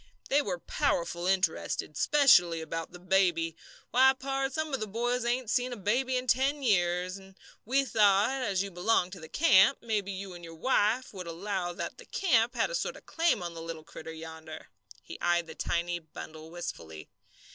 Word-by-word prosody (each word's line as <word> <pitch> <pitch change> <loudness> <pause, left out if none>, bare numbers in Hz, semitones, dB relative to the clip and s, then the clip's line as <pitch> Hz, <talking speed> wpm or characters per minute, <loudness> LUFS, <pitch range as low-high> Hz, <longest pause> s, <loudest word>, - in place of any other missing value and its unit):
They 285 +2 +4
were 190 -9 -3
powerful 175 +1 -1
interested, 185 -4 0
specially 180 - +5
about 165 0 -5
the - - -10
baby. 175 -3 +1 0.4
Why, 260 +2 +6
pard, 270 +1 -2
some 310 +1 -3
of 270 - 0
the 215 - -3
boys 240 +4 -1
hain't 240 -1 -1
seen 250 0 +1
a 245 - -5
baby 250 +6 0
in 250 - -3
ten 270 +4 +1
years, 180 -4 +1
and 195 0 -15 0.3
we 270 +4 +2
thought 215 +3 +3
as 200 -6 0
you 200 - -6
belonged 180 0 +1
to 185 - -9
the 160 -1 -11
camp, 270 - +5
maybe 210 -4 -1
you 195 -1 -6
and 175 -1 -11
your 165 0 -9
wife 245 +5 +1
would 185 -3 -7
allow 180 +1 -3
that - - -6
the - - -11
camp 245 - +2
had 240 - +1
a - - -5
sort - - -2
of - - -17
claim 325 - +1
on 170 -1 -5
the 165 - -8
little 165 -1 -7
critter 160 0 -9
yonder." 160 -1 -9 0.3
He - - -10
eyed 175 -1 +2
the 160 - -9
tiny 175 +1 -2
bundle 160 0 -10
wistfully. 85 - -7
195 Hz, 190 wpm, -29 LUFS, 170-250 Hz, 0.4 s, Why